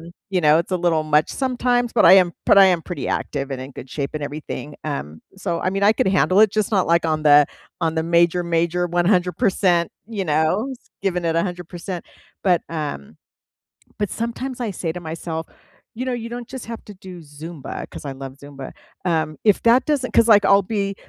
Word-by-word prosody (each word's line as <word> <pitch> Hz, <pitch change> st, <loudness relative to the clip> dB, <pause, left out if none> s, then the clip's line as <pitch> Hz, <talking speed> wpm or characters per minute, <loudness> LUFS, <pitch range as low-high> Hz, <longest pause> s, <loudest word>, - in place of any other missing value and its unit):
um, 165 Hz, +1 st, -11 dB, 0.2 s
you 185 Hz, -2 st, +1 dB
know, 155 Hz, -1 st, +5 dB
it's 170 Hz, -, -3 dB
a -, -, +2 dB
little 170 Hz, -3 st, +1 dB
much 155 Hz, 0 st, +2 dB
sometimes, 245 Hz, -2 st, 0 dB
but 230 Hz, -, +3 dB
I -, -, +9 dB
am 180 Hz, -2 st, +5 dB
but -, -, +6 dB
I 195 Hz, -, +9 dB
am 180 Hz, -3 st, +2 dB
pretty 180 Hz, +3 st, -5 dB
active 140 Hz, -1 st, -3 dB
and 135 Hz, -1 st, -4 dB
in 130 Hz, +1 st, -7 dB
good 130 Hz, -, -10 dB
shape 140 Hz, -2 st, -3 dB
and 155 Hz, -, -3 dB
everything, 145 Hz, 0 st, -6 dB
um, 80 Hz, -, -5 dB, 0.2 s
so, 170 Hz, -3 st, -3 dB
I 185 Hz, -, 0 dB
mean, 195 Hz, +1 st, -2 dB
I 205 Hz, +2 st, +6 dB
could 215 Hz, -, 0 dB
handle 190 Hz, +1 st, +3 dB
it, 215 Hz, -2 st, +6 dB
just 215 Hz, -2 st, 0 dB
not 195 Hz, -4 st, +2 dB
like 170 Hz, +1 st, +3 dB
on 155 Hz, -1 st, 0 dB
the 145 Hz, -1 st, +6 dB, 0.3 s
on 165 Hz, -2 st, 0 dB
the 160 Hz, -, 0 dB
major, 170 Hz, +1 st, +2 dB
major 170 Hz, +1 st, 0 dB
100%, 180 Hz, 0 st, +1 dB, 0.2 s
you 210 Hz, -4 st, -3 dB
know, 160 Hz, -, +1 dB, 0.3 s
giving 180 Hz, -3 st, -1 dB
it 165 Hz, 0 st, 0 dB
100%. 175 Hz, +1 st, -4 dB, 0.4 s
But, 180 Hz, -3 st, +3 dB
um, 145 Hz, -, -5 dB, 0.8 s
but 205 Hz, -2 st, -1 dB
sometimes 235 Hz, +3 st, -4 dB
I 235 Hz, -4 st, -2 dB
say 170 Hz, -3 st, -3 dB
to 180 Hz, -, -6 dB
myself, 160 Hz, 0 st, -5 dB, 0.5 s
"You 250 Hz, +3 st, -4 dB
know, 255 Hz, -, -1 dB
you 235 Hz, -1 st, -5 dB
don't 240 Hz, 0 st, -7 dB
just 260 Hz, -2 st, -8 dB
have 230 Hz, -1 st, -7 dB
to 210 Hz, -, -10 dB
do 185 Hz, -1 st, -11 dB
Zumba," 150 Hz, 0 st, -8 dB
'cause -, -, -10 dB
I 140 Hz, -, -4 dB
love 135 Hz, 0 st, -8 dB
Zumba, 140 Hz, -2 st, -9 dB, 0.3 s
um, 160 Hz, -4 st, 0 dB
if 210 Hz, -3 st, +3 dB
that 235 Hz, +2 st, +5 dB
doesn't 285 Hz, -5 st, 0 dB
'cause, 230 Hz, -, +5 dB
like, 205 Hz, -2 st, +6 dB
I'll 200 Hz, 0 st, +6 dB
be 200 Hz, 0 st, -2 dB
175 Hz, 210 wpm, -21 LUFS, 155-205 Hz, 0.8 s, I